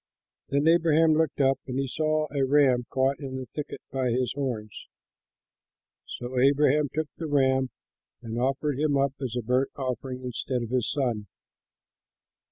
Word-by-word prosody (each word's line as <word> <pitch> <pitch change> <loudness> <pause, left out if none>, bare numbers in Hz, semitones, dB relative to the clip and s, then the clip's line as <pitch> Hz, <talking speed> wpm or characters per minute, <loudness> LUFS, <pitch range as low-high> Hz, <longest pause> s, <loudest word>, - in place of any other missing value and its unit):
Then 140 +2 +1
Abraham 165 -1 +5
looked 160 -2 +1
up, 135 0 +3
and 130 0 -3
he 135 - 0
saw 155 +3 0
a 140 -2 0
ram 130 -3 +3
caught 135 +1 +1
in 135 -3 -6
the 130 - -5
thicket 150 +3 -7
by 130 -1 0
his 125 +1 0
horns. 120 -7 -4 1.3
So 125 +1 -3
Abraham 145 +2 +4
took 155 +1 -1
the 165 - -4
ram 130 -2 +2 0.5
and 115 0 -4
offered 135 +2 0
him 150 -2 +2
up 135 0 +1
as 125 -3 -3
a 120 - -2
burnt 125 +4 +1
offering 130 -1 -4
instead 125 0 -3
of 115 - -6
his 125 -2 0
son. 120 -7 -1
135 Hz, 160 wpm, -27 LUFS, 125-145 Hz, 1.3 s, Abraham